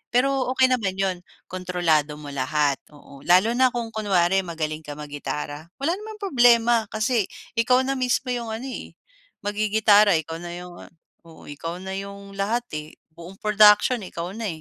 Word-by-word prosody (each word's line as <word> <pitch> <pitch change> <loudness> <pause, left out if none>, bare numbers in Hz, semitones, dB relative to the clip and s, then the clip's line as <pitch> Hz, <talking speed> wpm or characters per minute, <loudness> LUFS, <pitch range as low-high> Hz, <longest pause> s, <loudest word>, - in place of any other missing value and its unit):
pero 270 +1 +2
okey 260 0 +4
naman 210 -7 0
yun, 190 -1 -1 0.3
kontrolado 175 -5 0
mo 150 -1 -10
lahat, 140 +1 0
oo, 145 -1 -15
lalo 185 +6 +5
na 260 +1 +5
kung 235 -2 -4
kunwari 195 -4 +2
magaling 160 -3 -4
ka 145 -1 -7
mag 150 0 -9
gitara, 145 +1 -5
wala 280 +5 0
namang 430 +2 -9
problema 240 - +4
kasi 220 +1 +1 0.3
ikaw 250 +3 +3
na 270 - 0
mismo 255 +1 0
yung 240 -2 -3
ano, 220 +3 -5
eh, 260 - -8 0.5
magigitara 210 -1 +4
ikaw 160 +1 -6
na 175 - -6
yung, 180 0 -9 0.6
oo, 165 - -15
ikaw 165 +4 -6
na 190 - -6
yung 200 0 -9
lahat, 220 +5 -1 0.2
eh, 150 +1 -12 0.2
buong 170 +3 -11
production 210 +3 +5
ikaw 175 -1 -6
na, 225 -1 -3
200 Hz, 165 wpm, -24 LUFS, 165-235 Hz, 0.6 s, lalo